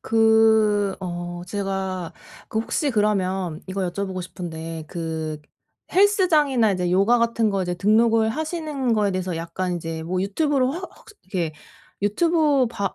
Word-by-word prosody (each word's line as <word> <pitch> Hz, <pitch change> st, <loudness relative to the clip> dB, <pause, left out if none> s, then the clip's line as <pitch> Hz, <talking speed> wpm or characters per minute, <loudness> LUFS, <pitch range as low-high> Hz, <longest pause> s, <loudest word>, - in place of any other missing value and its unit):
그 220 Hz, -3 st, +3 dB
어 175 Hz, -1 st, -5 dB
제가 190 Hz, -3 st, -3 dB, 0.4 s
그 220 Hz, -, -2 dB
혹시 285 Hz, +5 st, -1 dB
그러면 190 Hz, -6 st, 0 dB
이거 195 Hz, +1 st, -4 dB
여쭤보고 190 Hz, 0 st, -4 dB
싶은데 165 Hz, -3 st, -6 dB
그 160 Hz, -2 st, -4 dB, 0.5 s
헬스장이나 315 Hz, -, +4 dB
이제 180 Hz, -2 st, -1 dB
요가 200 Hz, +6 st, +4 dB
같은 230 Hz, -1 st, +1 dB
거 195 Hz, -2 st, 0 dB
이제 180 Hz, 0 st, -2 dB
등록을 220 Hz, +4 st, +3 dB
하시는 305 Hz, -4 st, -2 dB
거에 210 Hz, -2 st, +2 dB
대해서 185 Hz, -2 st, -2 dB
약간 175 Hz, +2 st, -3 dB
이제 165 Hz, -1 st, -5 dB
뭐 180 Hz, +3 st, -2 dB
유튜브로 265 Hz, +5 st, +1 dB
혹 365 Hz, +4 st, -6 dB
혹시 450 Hz, -, -17 dB
이렇게 175 Hz, -5 st, -3 dB, 0.5 s
유튜브 295 Hz, +4 st, +3 dB
봐 200 Hz, -4 st, -3 dB
200 Hz, 295 characters per minute, -23 LUFS, 180-235 Hz, 0.5 s, 헬스장이나